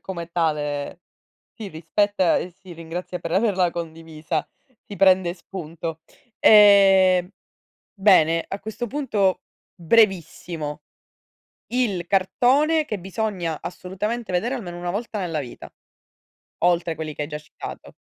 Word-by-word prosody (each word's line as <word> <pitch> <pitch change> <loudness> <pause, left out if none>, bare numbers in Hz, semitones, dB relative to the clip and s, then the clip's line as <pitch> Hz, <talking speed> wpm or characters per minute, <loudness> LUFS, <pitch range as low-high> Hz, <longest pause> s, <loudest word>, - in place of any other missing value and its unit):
come 170 -3 -6
tale, 150 -3 -2 0.5
si 220 -3 -7
rispetta 185 +3 +1
e 180 - -3
si 185 +1 -14
ringrazia 170 +2 -6
per 165 - -5
averla 190 -3 +2
condivisa. 160 -1 -5 0.4
Si 205 - -8
prende 190 -2 +4
spunto. 165 -3 -7 0.4
Ehm, 195 -3 +6 0.6
bene 175 -5 +4
a 195 - -5
questo 220 +4 -5
punto 215 -8 0 0.3
brevissimo: 170 -5 0 0.9
il 210 -9 -1
cartone 270 - +2
che 215 - -3
bisogna 185 -4 -3
assolutamente 210 +6 -4
vedere 225 +9 0
almeno 175 -8 -7
una 175 0 -4
volta 210 +3 -4
nella 170 -5 -2
vita, 125 -4 -9 0.9
oltre 175 -1 +1
quelli 155 -1 -5
che 150 - -4
hai - - -5
già 150 0 -5
citato. 150 - -10
180 Hz, 120 wpm, -23 LUFS, 165-205 Hz, 0.9 s, Ehm